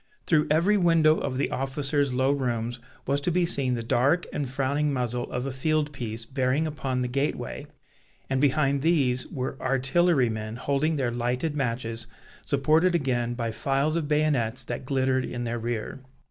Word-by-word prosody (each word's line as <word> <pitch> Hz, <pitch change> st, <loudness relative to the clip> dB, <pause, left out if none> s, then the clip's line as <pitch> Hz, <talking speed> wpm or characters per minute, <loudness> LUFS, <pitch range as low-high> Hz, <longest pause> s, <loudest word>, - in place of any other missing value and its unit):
Through 155 Hz, -3 st, +3 dB
every 170 Hz, +7 st, +3 dB
window 165 Hz, -4 st, +4 dB
of 130 Hz, -2 st, -3 dB
the 140 Hz, -, 0 dB
officers' 140 Hz, +1 st, 0 dB
low 130 Hz, +2 st, +2 dB
rooms 120 Hz, -3 st, -2 dB, 0.3 s
was 140 Hz, +1 st, 0 dB
to 160 Hz, -, 0 dB
be 175 Hz, +1 st, +2 dB
seen 135 Hz, -7 st, +1 dB
the 115 Hz, -, -3 dB
dark 135 Hz, +9 st, +2 dB
and 140 Hz, -3 st, -2 dB
frowning 140 Hz, +3 st, 0 dB
muzzle 125 Hz, -2 st, -2 dB
of 125 Hz, +1 st, -2 dB
a 135 Hz, -, -2 dB
field 150 Hz, +3 st, 0 dB
piece 115 Hz, -3 st, -5 dB
bearing 130 Hz, +4 st, 0 dB
upon 135 Hz, -4 st, -2 dB
the 125 Hz, -, 0 dB
gateway, 140 Hz, +4 st, -2 dB, 0.6 s
and 135 Hz, 0 st, 0 dB
behind 140 Hz, -1 st, +2 dB
these 135 Hz, -6 st, +2 dB
were 130 Hz, 0 st, -5 dB
artillerymen 130 Hz, -5 st, +1 dB
holding 140 Hz, +5 st, 0 dB
their 130 Hz, -4 st, 0 dB
lighted 125 Hz, +6 st, -1 dB
matches, 115 Hz, -4 st, -3 dB, 0.4 s
supported 155 Hz, +6 st, +3 dB
again 120 Hz, -6 st, 0 dB
by 115 Hz, -2 st, -2 dB
files 135 Hz, +6 st, 0 dB
of 165 Hz, -3 st, -1 dB
bayonets 140 Hz, -5 st, +1 dB
that 135 Hz, -, -5 dB
glittered 130 Hz, -1 st, +1 dB
in 120 Hz, -1 st, -4 dB
their 120 Hz, 0 st, -2 dB
rear. 115 Hz, +2 st, -4 dB
135 Hz, 165 wpm, -26 LUFS, 125-150 Hz, 0.6 s, window